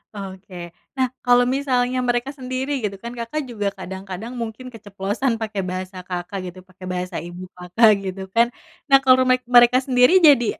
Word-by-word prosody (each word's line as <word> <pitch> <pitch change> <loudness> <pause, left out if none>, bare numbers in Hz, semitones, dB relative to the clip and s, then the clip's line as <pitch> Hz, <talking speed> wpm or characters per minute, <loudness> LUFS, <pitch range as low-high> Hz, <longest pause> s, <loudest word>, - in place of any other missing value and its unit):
Oke 190 -3 -9 0.2
nah 260 -1 +2 0.2
kalau 245 0 +5
misalnya 255 -2 0
mereka 245 +2 0
sendiri 260 +1 -4
gitu 200 -2 -2
kan 235 0 -6
Kakak 235 +6 -3
juga 210 -4 -3
kadang-kadang 190 +4 -7
mungkin 230 +2 -6
keceplosan 205 +3 -3
pakai 215 -3 -3
bahasa 185 +1 -5
Kakak 180 +2 -5
gitu 180 +1 -13
pakai 185 0 -12
bahasa 180 0 -4
ibu 175 +1 -9
Kakak 180 +5 +4
gitu 190 0 -5
kan 235 +1 +5 0.4
nah 275 - +8
kalau 260 0 +6
mek 255 0 +3
mereka 240 +1 +7
sendiri 250 +3 +4
jadi 275 -5 +6
220 Hz, 165 wpm, -21 LUFS, 190-250 Hz, 0.4 s, nah